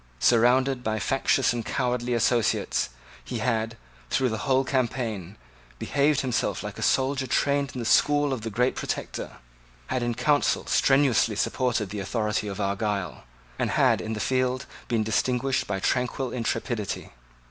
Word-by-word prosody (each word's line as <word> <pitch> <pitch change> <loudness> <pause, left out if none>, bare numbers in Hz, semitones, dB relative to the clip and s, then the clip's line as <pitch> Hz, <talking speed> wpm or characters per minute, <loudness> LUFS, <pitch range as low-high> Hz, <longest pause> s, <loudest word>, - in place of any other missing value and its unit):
Surrounded 125 - +3
by 110 -1 -1
factious 135 +2 +2
and 120 -1 -3
cowardly 125 0 -1
associates, 115 - +1 0.3
he 125 - -5
had, 115 -1 -1 0.3
through 130 -1 +1
the 110 -1 -3
whole 130 +3 +2
campaign, 115 -8 -2 0.4
behaved 145 - +1
himself 125 -4 -1
like - - -6
a - - -5
soldier 135 0 +1
trained 140 +2 +1
in - - -4
the 120 - -4
school 145 +3 +3
of 125 - -4
the 115 - -4
great 125 +4 +1
Protector, - - -4 0.5
had 125 - -2
in 120 -1 -1
council 145 +3 +2
strenuously 135 -5 +3
supported 115 -3 0
the 105 - -4
authority 105 +1 -1
of 100 0 -5
Argyle, 100 - -2 0.3
and - - +1
had - - +3
in 110 - -4
the 105 - -4
field 130 +2 0 0.2
been 115 -2 +1
distinguished 125 +4 0
by 95 -1 -2
tranquil 125 +4 -1
intrepidity. 115 -3 -3
120 Hz, 150 wpm, -26 LUFS, 110-130 Hz, 0.5 s, Surrounded